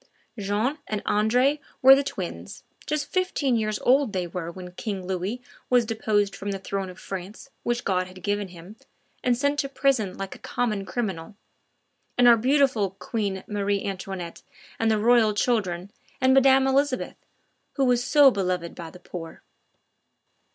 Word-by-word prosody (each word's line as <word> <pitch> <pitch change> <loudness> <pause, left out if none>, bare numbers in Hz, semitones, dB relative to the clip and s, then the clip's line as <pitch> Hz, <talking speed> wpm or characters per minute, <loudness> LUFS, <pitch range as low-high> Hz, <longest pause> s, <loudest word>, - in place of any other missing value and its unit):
Jean 210 +9 -1
and 210 -1 -3
Andre 250 +8 +2 0.2
were 265 +1 +10
the 275 - +4
twins; - - -6 0.2
just 300 -1 -1
fifteen 365 -9 +1
years 215 -2 0
old 260 -3 +3
they 185 -2 -1
were 170 -1 -5
when 180 0 -9
King 190 0 -5
Louis 190 +7 -3 0.3
was 245 -2 +4
deposed 215 -3 0
from 205 - -5
the 195 - -2
throne 195 0 -4
of 180 - -12
France 195 +8 -8
which 240 0 -1
God 185 -2 0
had 185 -1 -13
given 205 +1 -1
him, 180 +4 -13 0.5
and 245 -1 +2
sent 285 +2 0
to 275 - -1
prison 265 -8 0
like 195 -1 -5
a - - -13
common 215 -5 -2
criminal, 195 -3 -4 0.8
with 245 - +5
our 240 -1 +9
beautiful 255 -3 +2
Queen 195 0 -3
Marie 205 -1 -1
Antoinette 190 -3 -5 0.4
and 225 - +2
the 220 - +3
Royal 220 -1 +4
children, 200 -5 0 0.3
and 260 0 +4
Madame 270 0 +5
Elizabeth, 270 0 0 0.5
who 275 - +1
was 245 -1 +2
so 285 0 +6
beloved 180 -5 -2
by 170 -2 -8
the 180 - -14
poor! 170 -2 -9
210 Hz, 160 wpm, -25 LUFS, 190-250 Hz, 0.8 s, were